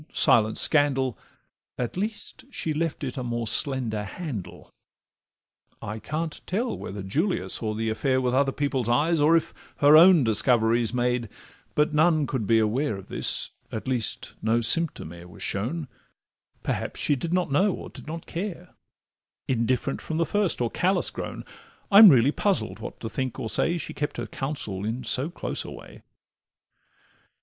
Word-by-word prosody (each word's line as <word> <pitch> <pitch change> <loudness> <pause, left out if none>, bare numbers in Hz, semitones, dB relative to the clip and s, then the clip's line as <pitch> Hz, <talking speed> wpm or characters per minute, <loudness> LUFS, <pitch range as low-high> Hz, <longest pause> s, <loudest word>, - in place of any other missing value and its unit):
silence 110 -2 +3
scandal, 135 -5 +3 0.6
At 120 -2 -3
least 215 +6 -5
she 160 - -3
left 160 0 -2
it 130 -1 -4
a 130 - -3
more 120 -1 -3
slender 120 -4 0
handle. 120 - -7 1.1
I 105 +1 -6
can't 155 +5 -4
tell 230 +7 -1
whether 100 0 -7
Julia 160 - -1
saw 110 -2 -2
the 110 +1 -2
affair 130 +4 0
With 125 -1 0
other 135 +1 +2
people's 135 -4 -1
eyes, 150 +6 +2
or 160 +3 +5
if 165 - -3 0.2
her 145 +1 +6
own 170 -1 +8
Discoveries 115 0 +2
made, 125 -2 -1 0.5
but 150 +1 +2
none 155 0 +3
could 130 -7 -3
be 115 - +4
aware 110 +2 0
Of 95 - -12
this, - - +1 0.2
at 110 - -5
least 125 -5 -1
no 110 +2 +2
symptom 120 - +1
e'er 85 0 -12
was 90 - -9
shown; 130 +10 -2 0.8
Perhaps - - -3
she 145 - +2
did 160 +5 -4
not 180 -4 0
know, 190 +8 +3
or - - -7
did - - -12
not 165 +1 -6
care, 180 0 -6 0.7
Indifferent 130 +2 0
from 160 - -4
the 165 - +2
first 200 -6 0
or 120 - 0
callous 185 0 +1
grown: - - -6 0.5
I'm 205 +1 +10
really 135 -2 +5
puzzled 200 +4 0
what - - -8
to 115 - -4
think 130 +2 -3
or 110 - -3
say, 170 +1 +2
She 160 - -5
kept 145 - -4
her - - -3
counsel 135 -9 -4
in 115 +4 -3
so 130 +6 0
close 175 - -4
a - - -8
way. - - -12
135 Hz, 165 wpm, -25 LUFS, 115-165 Hz, 1.1 s, I'm